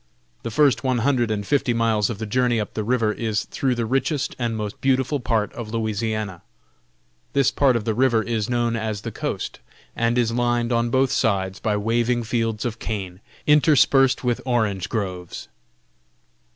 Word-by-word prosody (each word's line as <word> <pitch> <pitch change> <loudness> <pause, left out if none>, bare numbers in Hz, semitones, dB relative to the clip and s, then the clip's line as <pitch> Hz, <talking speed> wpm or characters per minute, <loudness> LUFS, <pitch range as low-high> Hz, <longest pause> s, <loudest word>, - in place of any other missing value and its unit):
The 115 - -4
first 120 -1 +3
one 130 -2 +1
hundred 120 -1 +1
and 105 -2 -2
fifty 135 -3 +1
miles 110 -3 +2
of 115 - -4
the 110 - -4
journey 120 +1 +1
up 105 - -4
the 110 - -2
river 115 -1 +1
is 110 -2 -2
though 130 -2 -1
the 120 -1 -1
richest 135 +4 -1
and 115 -2 -1
most 105 -1 -5
beautiful 135 +2 +1
part 115 -4 -1
of 115 -3 -7
Louisiana. 110 -4 -2 0.9
This 140 -2 +3
part 135 -3 +3
of 115 -2 -1
the 110 - +1
river 120 -1 +2
is 115 -2 -2
known 120 -1 0
as 110 -2 -3
the - - -5
coast, - - -4 0.4
and 115 +1 +1
is 120 -2 +2
lined 120 0 0
on 120 0 +1
both 130 +2 +2
sides 95 -6 0
by 105 -2 0
waving 120 +3 +1
fields 115 -1 -1
of 115 -2 -3
cane, 95 -4 -5 0.3
interspersed 140 -3 +4
with 120 -2 0
orange 110 -7 0
groves. 90 -5 -4
115 Hz, 175 wpm, -23 LUFS, 110-125 Hz, 0.9 s, interspersed